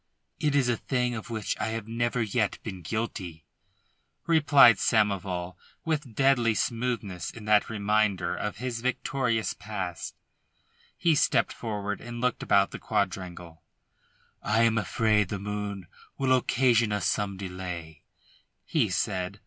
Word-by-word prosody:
It 150 -2 +1
is 135 -3 +3
a 120 -1 +1
thing 125 -1 -1
of 110 -1 -6
which 110 -2 -2
I - - -1
have 110 -1 -4
never 120 +1 0
yet 105 -1 0
been 95 -5 -6
guilty," 90 -5 -4 0.8
replied 145 -8 +6
Samoval, 95 -5 0 0.3
with 150 -8 -2
deadly 120 -4 +3
smoothness 115 -5 -2
in 115 -2 -10
that 105 -1 +3
reminder 105 -4 +1
of 105 -2 -4
his 120 -1 -4
victorious 125 -2 0
past. 95 -5 -5 0.8
He 170 - +3
stepped 145 - +2
forward 105 -3 -4
and 120 0 -7
looked 125 -1 0
about 100 0 +3
the - - -7
quadrangle. 90 -5 -3 0.8
"I 110 +2 +2
am 115 -1 +3
afraid 105 0 +1
the 100 - -2
moon 100 -1 -4 0.3
will 130 -1 +3
occasion 120 -3 +2
us 105 -4 -1
some 100 -2 0
delay," 90 -4 -6 0.6
he - - +1
said. 95 +2 -2
110 Hz, 135 wpm, -27 LUFS, 100-120 Hz, 0.8 s, replied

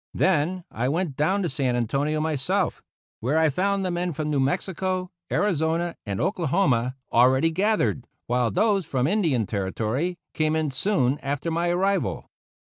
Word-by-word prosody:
Then 180 +1 +1
I 125 +3 -1
went 165 -1 -1
down 190 +8 +1
to - - +1
San 130 -2 0
Antonio 140 +6 0
myself, 160 +5 0 0.4
where 130 +7 0
I 160 -1 +4
found 195 +5 0
the 185 - 0
men 175 0 -1
from 150 +1 -3
New 145 - +1
Mexico, 185 +6 -1 0.2
Arizona, 170 -2 0
and 100 -1 -2
Oklahoma 145 - +1 0.2
already 130 +6 +4
gathered, 190 - 0 0.2
while 120 -1 +1
those 200 - +2
from 130 -5 0
Indian 160 - +1
Territory 110 - -2 0.2
came 155 -1 +1
in 155 -2 0
soon 135 -3 +1
after 145 +4 -3
my 170 +2 0
arrival. 195 +3 0
155 Hz, 150 wpm, -25 LUFS, 130-185 Hz, 0.4 s, I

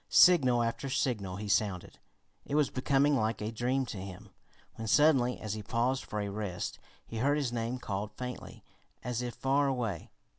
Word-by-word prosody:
Signal 130 -10 +6
after 115 +4 -2
signal 105 -8 -1
he 105 +2 -5
sounded. 100 -3 0 0.4
It 145 - -3
was 150 -3 +3
becoming 140 +2 +2
like 110 -2 0
a 105 +1 -3
dream 125 +4 0
to 110 - -6
him, 95 -1 -9 0.4
when 110 - -6
suddenly, 135 -1 +4
as 110 -2 -4
he 110 - -4
paused 120 +5 0
for 105 - -4
a 100 - -3
rest, 100 -3 -4 0.3
he 115 - -7
heard 140 +6 +2
his 135 -5 -1
name 120 +1 -2
called 105 -3 -4
faintly, 125 -1 -7 0.4
as 125 0 -2
if 120 -1 -4
far 140 +1 +2
away. 125 -6 -2
120 Hz, 180 wpm, -31 LUFS, 105-135 Hz, 0.4 s, Signal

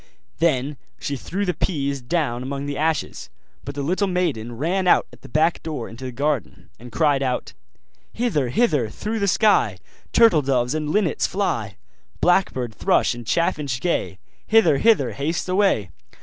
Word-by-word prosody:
Then 145 -3 +1 0.2
she 140 - -3
threw 190 +9 -3
the 180 - 0
peas 140 -7 -2
down 125 -3 -1
among 140 +2 -4
the 145 0 -3
ashes, 155 - -2 0.3
but 140 - -7
the 140 - -3
little 185 +7 0
maiden 145 -11 -2
ran 180 +7 0
out - - +5
at - - -16
the - - -12
back 160 +2 +2
door 150 -7 -5
into 115 +3 -9
the 130 - -4
garden, 125 -9 -3
and 120 +1 -11
cried 145 -2 +2
out: 130 -2 -2 0.6
'Hither, 185 - 0
hither, 145 - +1
through 220 - -4
the 200 - +1
sky, 210 +3 +3 0.3
Turtle 225 -10 +5
doves 130 -2 0
and 155 -1 -2
linnets, 180 -1 +1
fly! 115 - -2 0.4
Blackbird, 130 - +1
thrush, - - +2
and 120 -1 -9
chaffinch 145 -5 0
gay, 170 - -1 0.3
Hither, 175 -11 +4
hither, 225 -1 +3
haste 155 +6 -2
away! 185 - +1
150 Hz, 165 wpm, -22 LUFS, 130-180 Hz, 0.6 s, out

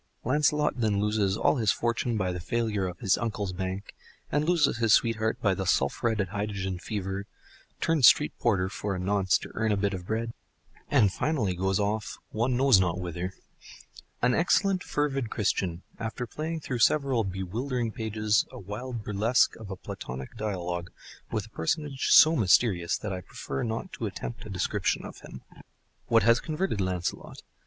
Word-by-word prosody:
Lancelot 150 +1 +2
then 105 -3 +2
loses 105 -1 +1
all - - +3
his 110 -4 +3
fortune 120 0 -1
by 95 -3 0
the 90 - -4
failure 105 0 -1
of 90 -1 -6
his 95 -6 +2
uncle's 105 -5 -2
bank, 95 +2 -4 0.4
and 150 +3 +1
loses 160 -8 +3
his 115 -2 +3
sweetheart 110 -1 0
by 100 -3 +4
the 95 0 -3
sulphuretted 110 -3 +1
hydrogen 100 -2 -3
fever; 100 0 -4 0.5
turns 155 -8 +5
street 150 - +5
porter 100 -6 +2
for 100 0 -3
the 90 - -4
nonce 95 -2 +3
to - - -10
earn 110 -1 0
a 105 - +2
bit 100 0 0
of 90 -1 -6
bread, 115 +1 -2 0.6
and 100 -3 +4
finally 120 - 0
goes 95 +2 0
off 105 +1 -1
one 120 +3 0
knows 130 -6 +6
not 90 -1 0
whither; 90 +1 -4 0.9
an 125 0 +4
excellent 185 +4 +2
fervid 135 -5 -1
Christian, 95 -5 -1 0.2
after 115 +2 -3
playing 160 +7 -4
through 125 -4 -3
several 135 -1 +3
bewildering 110 +6 -3
pages 110 -1 0
a - - -11
wild 110 +4 -6
burlesque 105 +4 +2
of 110 - -9
the 95 - -5
Platonic 65 -7 -7
dialogue 90 -4 -3 0.4
with 105 -2 -1
a - - -15
personage 135 - -2
so 160 +1 +8
mysterious 95 - +3
that 105 -2 -4
I 90 - -4
prefer 70 -5 -5
not 115 -1 -3
to - - -3
attempt - - -6
a - - -10
description - - -1
of - - -9
him. - - -11 0.7
What 115 0 +4
has 115 +1 +5
converted 155 - -2
Lancelot? 90 -2 -3
105 Hz, 170 wpm, -28 LUFS, 95-120 Hz, 0.9 s, so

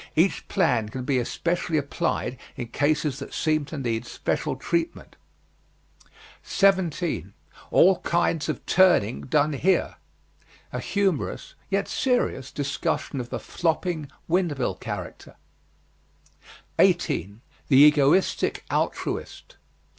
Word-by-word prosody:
Each 170 +5 +2
plan 115 -5 +1
can 130 +3 -5
be 130 0 +1
especially 170 +6 -1
applied 140 -3 -2 0.2
in 120 -2 -5
cases 145 0 0
that 140 - -8
seem 155 -2 +1
to 150 +2 -7
need 120 -3 -2
special - - -2
treatment. 335 0 -3 1.3
17. 175 - +1 0.4
ALL 185 +1 +5
KINDS 170 -2 0
OF - - -4
TURNING 175 - +4
DONE 150 +2 +2
HERE. 180 +6 +1 0.8
A 125 - -2
humorous, 190 +1 -1 0.2
yet 195 0 0
serious, 245 - 0
discussion 140 -1 -2
of 120 -1 -5
the - - -4
flopping, 165 -3 -2 0.2
wind 170 -4 +1
mill 125 - 0
character. - - -7 1.4
18. 100 +6 +2 0.3
THE 135 0 +7
EGOISTIC 150 +4 +3
ALTRUIST. - - -3
150 Hz, 110 wpm, -25 LUFS, 130-175 Hz, 1.4 s, THE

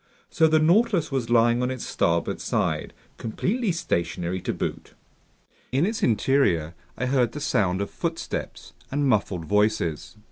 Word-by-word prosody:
So 160 - +4
the 155 0 +4
Nautilus 175 +1 +3
was 130 -4 -2
lying 120 +1 +4
on 125 - 0
its 130 -1 -4
starboard 85 0 0
side, - - -1 0.2
completely 200 - -1
stationary 85 - -2
to - - -2
boot. - - -5 0.8
In 135 +6 +2
its 220 +3 -2
interior 105 - +2 0.2
I 125 - -1
heard 125 -3 +1
the 150 - -5
sound 95 -9 +1
of 100 - -4
footsteps 90 - -5 0.2
and 145 +1 +1
muffled 100 -8 0
voices. 105 -4 0
120 Hz, 145 wpm, -25 LUFS, 95-150 Hz, 0.8 s, So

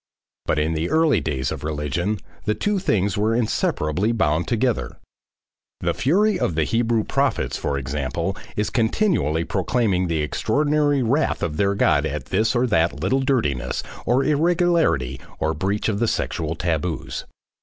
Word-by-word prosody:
But - - +1
in 75 +2 +1
the 80 +2 -1
early 160 -2 +3
days 65 -4 -2
of - - -5
religion 75 +7 -1 0.3
the 105 - +1
two 205 -1 0
things 100 - 0
were 110 +2 +2
inseparably 105 -4 0
bound 85 -7 +1
together; 120 0 0 0.8
the - - 0
fury 195 +8 +2
of 85 - 0
the 80 - +2
Hebrew 115 +4 +1
prophets, 140 0 0
for 70 -1 -2
example, 70 -1 -2 0.2
is 105 - -1
continually 115 - +1
proclaiming 95 0 0
the 80 -2 0
extraordinary 145 - +1
"wrath" 135 +7 +1
of 75 -3 -2
their 100 +2 +2
God - - +3
at 75 -2 -4
this 110 - +1
or 120 +1 +3
that 85 - +1
little 95 - +1
dirtiness 115 - 0 0.2
or 125 +4 +2
irregularity 160 - +2 0.2
or 80 0 0
breach 100 +4 -1
of 105 -2 0
the 115 - +1
sexual 80 -6 -2
tabus. 85 -1 -2
105 Hz, 155 wpm, -22 LUFS, 80-130 Hz, 0.8 s, early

